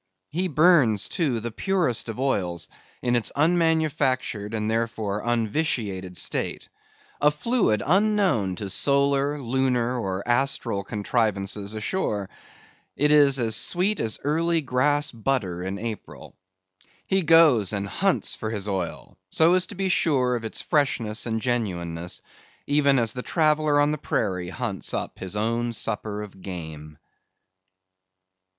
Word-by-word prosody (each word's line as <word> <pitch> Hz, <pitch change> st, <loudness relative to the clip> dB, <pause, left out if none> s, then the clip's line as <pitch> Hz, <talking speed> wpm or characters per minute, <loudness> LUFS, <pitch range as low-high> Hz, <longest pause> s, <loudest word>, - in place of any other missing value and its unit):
He 180 Hz, +4 st, 0 dB
burns, 150 Hz, -, +4 dB
too, 140 Hz, -9 st, 0 dB
the 120 Hz, +1 st, -4 dB
purest 170 Hz, -, 0 dB
of 115 Hz, -, -6 dB
oil, 100 Hz, -10 st, 0 dB, 0.5 s
in 120 Hz, 0 st, +2 dB
its 120 Hz, -3 st, +1 dB
unmanufactured, 155 Hz, -9 st, +1 dB
and, 105 Hz, -1 st, -2 dB
therefore, 110 Hz, -3 st, -2 dB
unvitiated 110 Hz, -, -1 dB
state; -, -, -2 dB, 0.5 s
a 145 Hz, -, +6 dB
fluid 150 Hz, -, 0 dB
unknown 190 Hz, -, +2 dB
to 100 Hz, -, -5 dB
solar, 140 Hz, +2 st, +2 dB
lunar, 125 Hz, -1 st, 0 dB
or 95 Hz, -2 st, -3 dB
astral 120 Hz, -5 st, 0 dB
contrivances 105 Hz, -1 st, -1 dB
ashore. 105 Hz, -, -2 dB, 0.6 s
It 150 Hz, +1 st, +2 dB
is 135 Hz, -6 st, +4 dB
sweet 185 Hz, -, 0 dB
as 110 Hz, -2 st, -1 dB
early 165 Hz, +3 st, +1 dB
grass 145 Hz, +3 st, +1 dB
butter 110 Hz, -7 st, -1 dB
in 95 Hz, +2 st, -4 dB
April. 110 Hz, 0 st, -7 dB, 0.7 s
He 190 Hz, 0 st, +1 dB
goes 155 Hz, -, +5 dB
and 100 Hz, -1 st, -2 dB
hunts -, -, +1 dB
for 110 Hz, -, -4 dB
his 105 Hz, -2 st, -3 dB
oil, 95 Hz, -4 st, -4 dB
so 165 Hz, +2 st, +4 dB
as 185 Hz, 0 st, +2 dB
to 205 Hz, -, -9 dB
be 190 Hz, +1 st, -1 dB
sure 135 Hz, -8 st, +2 dB
of 115 Hz, -, -4 dB
its 110 Hz, -, -4 dB
freshness 120 Hz, -7 st, 0 dB
and 110 Hz, -1 st, -1 dB
genuineness, 90 Hz, -8 st, -3 dB, 0.4 s
even 140 Hz, -1 st, +3 dB
as 115 Hz, -3 st, +2 dB
the 125 Hz, -, -4 dB
traveller 155 Hz, -1 st, +2 dB
on 145 Hz, +1 st, +3 dB
the 150 Hz, -, -3 dB
prairie 90 Hz, -8 st, -2 dB
hunts 100 Hz, -1 st, -3 dB
up -, -, -5 dB
his 95 Hz, +1 st, -5 dB
own 115 Hz, +2 st, -1 dB
supper 105 Hz, -1 st, -3 dB
of 95 Hz, -2 st, -12 dB
game. 80 Hz, -5 st, -8 dB
120 Hz, 135 wpm, -25 LUFS, 105-150 Hz, 0.7 s, a